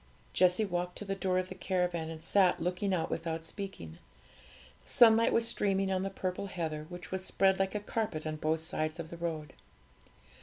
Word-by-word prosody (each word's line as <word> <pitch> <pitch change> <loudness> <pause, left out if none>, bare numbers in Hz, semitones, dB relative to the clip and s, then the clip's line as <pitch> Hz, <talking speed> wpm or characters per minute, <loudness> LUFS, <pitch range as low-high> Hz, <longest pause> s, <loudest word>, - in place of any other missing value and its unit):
Jessie 185 +4 +4
walked 180 -1 -3
to 210 - -6
the 195 - -1
door 190 -1 0
of 185 0 -1
the - - -5
caravan, 180 -4 -1
and 160 0 -8
sat 185 +1 +4
looking 180 +4 -1
out 175 -3 0
without 165 -1 -3
speaking. 175 - -7 0.8
The - - -9
sunlight 230 -1 +6
was 230 0 +3
streaming 195 -3 +1
on 185 -1 +1
the 195 - -1
purple 190 0 -3
heather, 160 -4 -4
which 175 0 -9
was 190 0 -2
spread 190 0 +2
like 195 +1 0
a - - +1
carpet 205 -7 -3
on 155 0 -3
both 155 +1 0
sides 155 -1 -2
of 160 -1 -6
the 170 - -7
road. 160 -3 -4
180 Hz, 195 wpm, -32 LUFS, 165-195 Hz, 0.8 s, sunlight